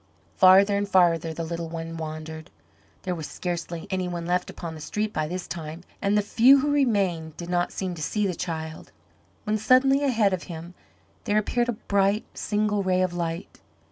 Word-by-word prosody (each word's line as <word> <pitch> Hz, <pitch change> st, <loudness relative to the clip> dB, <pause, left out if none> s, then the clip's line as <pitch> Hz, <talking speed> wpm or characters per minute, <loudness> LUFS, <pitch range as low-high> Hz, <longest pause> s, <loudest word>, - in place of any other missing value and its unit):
Farther 195 Hz, +2 st, +6 dB
and 200 Hz, 0 st, -2 dB
farther 170 Hz, -4 st, +3 dB
the 165 Hz, +1 st, -4 dB
little 170 Hz, 0 st, -4 dB
one 165 Hz, 0 st, -5 dB
wandered. 160 Hz, +1 st, -6 dB, 0.5 s
There 185 Hz, -, -1 dB
was 160 Hz, -3 st, -5 dB
scarcely 170 Hz, -1 st, -4 dB
any 185 Hz, -1 st, -1 dB
one 175 Hz, -1 st, -4 dB
left 180 Hz, +1 st, 0 dB
upon 170 Hz, -2 st, -7 dB
the 155 Hz, -, -9 dB
street 210 Hz, +8 st, -2 dB
by 155 Hz, -1 st, -1 dB
this 180 Hz, +2 st, -5 dB
time, 165 Hz, 0 st, -6 dB, 0.2 s
and 200 Hz, +1 st, +2 dB
the 210 Hz, -, +2 dB
few 255 Hz, +6 st, +6 dB
who 295 Hz, +1 st, 0 dB
remained 195 Hz, -, +1 dB
did 175 Hz, 0 st, -6 dB
not 175 Hz, 0 st, +1 dB
seem 185 Hz, -2 st, -3 dB
to 165 Hz, -, -8 dB
see 210 Hz, +7 st, 0 dB
the 190 Hz, -, 0 dB
child, 160 Hz, -1 st, -5 dB, 0.5 s
when 215 Hz, 0 st, 0 dB
suddenly 270 Hz, +5 st, +4 dB
ahead 225 Hz, -8 st, +2 dB
of 185 Hz, -, -2 dB
him 170 Hz, +1 st, -7 dB, 0.5 s
there 205 Hz, -, +1 dB
appeared 240 Hz, +3 st, +1 dB
a -, -, +1 dB
bright, 200 Hz, 0 st, +1 dB
single 210 Hz, -1 st, 0 dB
ray 185 Hz, -1 st, +2 dB
of 180 Hz, -1 st, -1 dB
light. 170 Hz, +1 st, -4 dB
180 Hz, 190 wpm, -25 LUFS, 165-210 Hz, 0.5 s, Farther